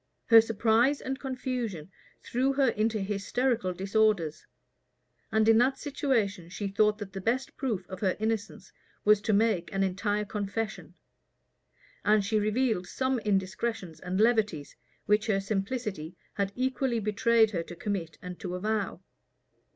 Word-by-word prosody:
Her 230 -1 +8
surprise 225 +5 +2
and 265 0 -4
confusion 250 - -4 0.3
threw 260 +3 0
her 270 -2 +3
into 215 0 0
hysterical 210 +2 0
disorders; 195 -3 +1 0.8
and 220 0 +3
in 225 0 +6
that 260 +2 +3
situation 225 - -1
she 200 +3 -4
thought 210 +1 +2
that 205 -3 -8
the 195 - -5
best 240 +6 -1
proof 220 - -2
of 190 -1 -7
her 190 -2 0
innocence 220 -2 -3 0.3
was 210 -1 +5
to 215 - 0
make 210 -4 +2
an 195 0 0
entire 205 +2 -1
confession; 210 +1 -4 1.1
and 210 -1 +3
she 215 +1 +1
revealed 215 -3 0
some 260 +4 -1
indiscretions 195 -3 -2
and 185 +2 -3
levities, 215 -10 +1 0.3
which 210 +2 +2
her 200 -3 +2
simplicity 195 -4 -3 0.2
had 200 -1 -1
equally 260 -1 0
betrayed 220 +1 +3
her 175 -5 -1
to 170 +1 -9
commit 175 -3 -4
and 180 0 -7
to 180 -3 -4
avow. 205 -1 -2
210 Hz, 145 wpm, -29 LUFS, 195-230 Hz, 1.1 s, Her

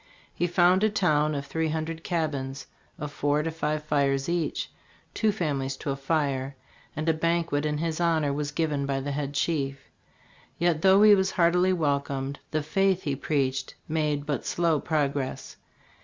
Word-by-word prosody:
He 175 - 0
found 180 +2 +4
a 215 - +4
town 155 -7 +2
of 140 0 -3
three 160 +1 -1
hundred 160 +1 -3
cabins, 140 -6 -2 0.3
of 150 -1 -5
four 145 +1 0
to 165 - -2
five 155 -1 -2
fires 140 -2 +1
each, 170 -2 -2 0.4
two 220 -1 +2
families 140 -8 -2
to 140 - -3
a - - -1
fire; 135 -2 -1 0.4
and 155 +2 -3
a 160 - +4
banquet 165 -2 0
in 150 0 -1
his 160 +1 -2
hon 165 -3 +2
or 140 - 0
was 145 0 -2
given 145 -2 -1
by 135 -1 0
the 140 +2 -3
head 140 0 -3
chief. 140 -3 -2 0.7
Yet, 170 -2 +1
though 195 +2 +6
he 215 -1 +9
was 190 -1 +3
heartily 180 +1 +3
welcomed, 140 -4 -1
the 155 -1 -1
faith 190 +4 +1
he 145 -2 -1
preached 135 -2 -1
made 150 -2 -1
but 145 -5 -2
slow 165 -3 +1
progress. 140 -3 -2
150 Hz, 170 wpm, -27 LUFS, 140-170 Hz, 0.7 s, he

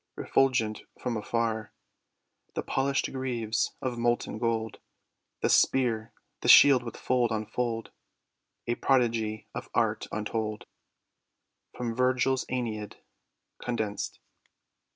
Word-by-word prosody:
Refulgent 125 -5 +1 0.2
from 120 - -2
afar, 110 -1 -2 0.8
The - - -2
polished 135 +1 0
greaves 120 -4 -1
of 125 -2 -2
molten 120 -2 0
gold, 110 -2 -1 0.6
The - - +2
spear, 115 -4 +3 0.3
the - - -4
shield 135 -3 +9
with 120 -1 -7
fold 125 -2 +1
on 110 -1 -1
fold, 115 0 -3 0.7
A 120 - 0
prodigy 115 -5 +1
of - - -6
art - - +1
untold. 105 0 -3 1.1
From 120 -2 -3
VIRGIL'S 130 +1 +2
^ENEID 110 -4 -3 0.6
(Condensed.) 110 -4 -3
115 Hz, 105 wpm, -28 LUFS, 110-125 Hz, 1.1 s, shield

